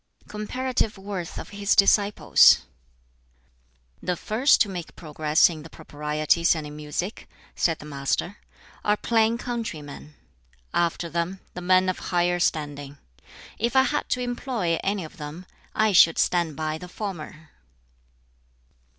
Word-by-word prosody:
] - - -50
BOOK - - -30
XI - - -25
Comparative 225 +1 -2
Worth 190 -3 -6
of - - -7
His 205 0 0
Disciples 200 +1 +5 1.4
"The 180 - -1
first 250 +7 +3
to - - +4
make 180 -4 -7
progress 155 -1 +2
in 160 -3 -6
the 160 - -11
Proprieties 150 +4 0
and 155 -2 -5
in 150 0 -9
Music," 150 +6 -5 0.3
said 165 -2 +1
the - - -12
Master, 145 +6 -2 0.5
"are 210 0 +2
plain 225 0 +2
countrymen; 165 - -6 0.6
after 170 0 0
them, 170 +3 -3
the 180 - -7
men 185 +1 +3
of 185 - -1
higher 175 0 +1
standing. 145 -4 -2 0.6
If 235 +3 -1
I 265 - +6
had 295 +2 -1
to 250 - 0
employ 240 -8 -2
any 195 -1 -1
of 155 - -11
them, 155 +4 -8 0.3
I 215 0 +3
should 165 -3 +6
stand 170 -4 +1
by 155 +1 -3
the 180 - -10
former." 160 -6 -7
175 Hz, 145 wpm, -25 LUFS, 155-210 Hz, 1.4 s, I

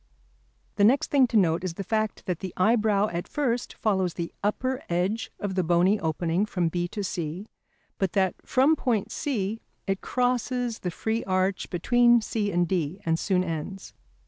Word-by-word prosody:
The 200 - +3
next 270 +9 +4
thing 275 -4 +5
to 230 - +1
note 170 -3 +3
is 180 -3 -3
the 195 - -4
fact 215 +2 -1
that 180 -3 -2
the 190 -3 -6
eyebrow 210 0 +3
at 170 +1 -4
first 245 -5 -1
follows 190 -5 0
the 170 -1 -4
upper 255 +6 -1
edge 185 +6 -1
of 200 -2 -3
the 185 -1 +1
bony 175 +5 +3
opening 165 +4 0
from 180 -5 0
B 175 +1 -1
to 205 +3 -5
C, 175 +1 -4 0.5
but 190 -3 0
that 190 -2 +2
from 275 +5 +3
point 235 -8 -1
C 225 -7 -2 0.2
it 195 0 -1
crosses 245 -1 0
the 180 - -3
free 220 +6 -2
arch 185 0 0
between 240 +6 +4
C 215 -2 -2
and 175 -1 +1
D 175 0 -1
and 165 0 +1
soon 185 -2 +1
ends. 175 +3 -5
195 Hz, 175 wpm, -26 LUFS, 175-230 Hz, 0.5 s, thing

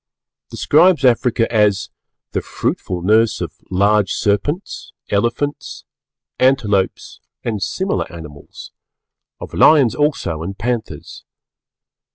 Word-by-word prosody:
describes 165 0 +3
Africa 120 -1 +2
as 100 -3 +2 0.4
"the - - -2
fruitful 90 -2 -3
nurse 110 +3 +3
of 85 -4 -6
large 100 +2 +2
serpents, 120 - -2 0.2
elephants, 115 - -2 0.5
antelopes 105 -7 0 0.2
and 110 -4 -3
similar 190 - -2
animals; 75 -4 -11 0.7
of - - -9
lions 140 -7 +5
also 145 - -1
and 95 +4 -6
panthers." 115 +2 -5
105 Hz, 95 wpm, -18 LUFS, 95-130 Hz, 0.7 s, lions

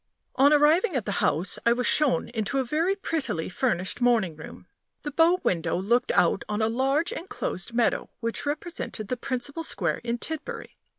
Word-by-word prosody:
On 275 +2 +5
arriving 310 +6 +4
at 240 -6 -1
the 205 - -2
house, 165 +6 +1
I 235 - +4
was 250 0 -1
shown 300 -4 +3
into 225 +2 -2
a 265 - +2
very 320 +9 0
prettily 310 - -2
furnished 190 0 -1
morning 230 -9 +2
room. 160 - -11 0.4
The 295 - -4
bow 335 +4 +4
window 170 -2 0
looked 235 +6 +1
out - - +3
on 210 0 -1
a 220 0 +2
large 270 +7 +1
inclosed 235 - -4
meadow, 235 -1 +1
which 230 -1 -2
represented 290 - -4
the 250 - 0
principal 275 +6 -3
square 170 - -1
in 235 0 -2
Tidbury. 315 +5 -6
245 Hz, 175 wpm, -26 LUFS, 215-300 Hz, 0.4 s, On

